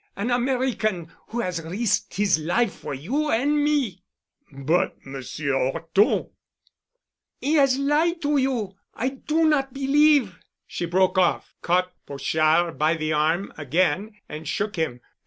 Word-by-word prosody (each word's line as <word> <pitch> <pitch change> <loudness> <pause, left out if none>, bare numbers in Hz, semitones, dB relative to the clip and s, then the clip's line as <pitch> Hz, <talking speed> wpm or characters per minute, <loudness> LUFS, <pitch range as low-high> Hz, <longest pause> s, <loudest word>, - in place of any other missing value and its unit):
An 220 +5 -2
American—who 240 -5 -1
has 180 -4 -3
risked 200 +5 -1
his 200 -5 +2
life 185 +7 0
for 140 - -6
you 265 - -2
and 290 +4 +2
me——" 285 - 0 0.5
"But 140 +5 0
Monsieur 135 +1 -4
'Orton——" 165 +10 +1 1.1
"He 290 - -1
has 275 -4 +4
lied 305 +5 +1
to 290 0 +2
you. 250 -7 -1 0.2
I 255 - -1
do 305 +4 0
not 275 -4 +1
believe——" 275 - +3 0.3
She 175 - -4
broke 185 +2 +2
off, 185 - +1
caught 180 +1 +1
Pochard 155 +4 +1
by 155 +2 +3
the 155 -1 -2
arm 160 +6 0
again 185 - 0
and 155 +1 -8
shook 205 +5 -2
him. 155 -8 -2
195 Hz, 135 wpm, -24 LUFS, 160-270 Hz, 1.1 s, has